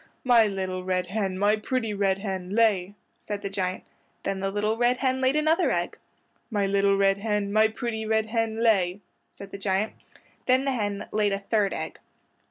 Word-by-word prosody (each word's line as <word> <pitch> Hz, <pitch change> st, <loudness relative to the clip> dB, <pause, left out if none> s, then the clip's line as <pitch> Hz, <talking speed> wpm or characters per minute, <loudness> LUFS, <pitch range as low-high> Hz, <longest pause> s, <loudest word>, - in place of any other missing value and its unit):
"My 235 Hz, -4 st, +5 dB
little 190 Hz, -2 st, -3 dB
red 185 Hz, -1 st, 0 dB
hen, 195 Hz, -4 st, -1 dB
my 205 Hz, +2 st, +3 dB
pretty 225 Hz, 0 st, -2 dB
red 195 Hz, -1 st, +1 dB
hen, 190 Hz, -1 st, -4 dB
lay!" 205 Hz, -4 st, +2 dB, 0.2 s
said 205 Hz, -1 st, -5 dB
the 200 Hz, -, -3 dB
giant. 185 Hz, -1 st, -2 dB, 0.4 s
Then 195 Hz, -1 st, -2 dB
the 195 Hz, 0 st, -1 dB
little 210 Hz, +2 st, 0 dB
red 240 Hz, +2 st, +2 dB
hen 260 Hz, 0 st, 0 dB
laid 260 Hz, +2 st, +2 dB
another 315 Hz, +4 st, +3 dB
egg. -, -, -1 dB, 0.5 s
"My 205 Hz, -4 st, 0 dB
little 200 Hz, 0 st, +2 dB
red 195 Hz, 0 st, +3 dB
hen, 210 Hz, -1 st, -1 dB
my 215 Hz, +1 st, +5 dB
pretty 220 Hz, 0 st, -4 dB
red 220 Hz, 0 st, +2 dB
hen, 225 Hz, 0 st, -1 dB
lay," 195 Hz, -4 st, +2 dB, 0.4 s
said 200 Hz, 0 st, -10 dB
the 200 Hz, -, -7 dB
giant. 195 Hz, +2 st, 0 dB, 0.5 s
Then 260 Hz, +1 st, +3 dB
the 275 Hz, -, +1 dB
hen 205 Hz, -5 st, -2 dB
laid 210 Hz, -1 st, +1 dB
a -, -, 0 dB
third 200 Hz, 0 st, 0 dB
egg. -, -, -5 dB
205 Hz, 185 wpm, -26 LUFS, 195-225 Hz, 0.5 s, My